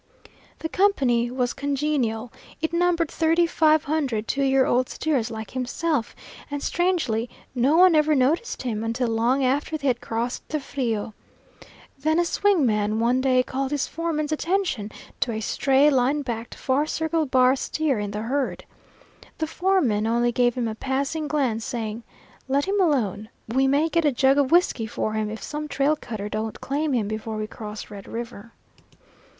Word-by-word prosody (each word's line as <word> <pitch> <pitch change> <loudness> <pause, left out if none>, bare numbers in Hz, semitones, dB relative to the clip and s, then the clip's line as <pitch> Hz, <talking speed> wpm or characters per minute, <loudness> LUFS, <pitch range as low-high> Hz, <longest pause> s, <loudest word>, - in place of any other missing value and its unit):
The 320 - -4
company 265 -12 +2
was 250 -1 -1
congenial; 270 -5 -1 0.3
it 320 +1 -2
numbered 340 -2 +1
thirty 330 +1 +3
five 315 -2 +3
hundred 275 -8 -1
two 275 - -1
year 270 -1 +3
old 250 +1 +1
steers 270 -8 -1
like 220 -2 -7
himself, 260 +1 -2 0.3
and 285 -1 -4
strangely 320 -11 0 0.2
no 265 +5 +3
one 365 0 +7
ever 305 0 +4
noticed 290 - +1
him 225 -4 -2
until 230 +2 -1
long 240 +4 +2
after 290 +4 0
they 285 - -8
had 245 -3 +1
crossed 235 +2 -3
the 305 - -1
Frio. 235 -6 -3 0.9
Then 315 +3 +1
a 345 - +3
swing 380 -3 +2
man 215 -1 +1
one 245 +3 +2
day 255 -1 +3
called 265 +1 -3
his 290 -1 0
foreman's 315 -2 -2
attention 320 - -1 0.3
to 240 - 0
a 220 - -3
stray, 270 +6 +3
line 275 +3 +2
backed, 235 -2 -5
bar 280 +3 +2
circle 320 0 -1
bar 255 0 +4
steer 280 -2 -1
in 205 -1 -3
the 210 +1 -4
herd. 270 +3 -2 0.7
The 320 - -1
foreman 315 - +1
only 240 +1 +2
gave 245 0 +2
him 245 -2 -1
a 220 - -3
passing 275 +6 -2
glance, 260 -7 0
saying, 230 -3 -4 0.5
"Let 275 +2 +1
him 395 +1 +1
alone; 220 - 0 0.2
we 265 +4 +2
may 285 +4 +3
get 335 0 +1
a 295 - +4
jug 270 +2 +3
of 275 -2 +1
whiskey 335 -10 +3
for 215 -1 -2
him 215 -1 -1
if 220 +1 -7
some 300 0 -4
trail 290 +1 +1
cutter 220 -8 -6
don't 215 +1 -4
claim 290 +2 -1
him 225 -5 +1
before 215 +1 -4
we 215 - -2
cross 215 -1 -8
Red 200 -2 -9
River." 230 -1 -7
265 Hz, 175 wpm, -24 LUFS, 230-305 Hz, 0.9 s, one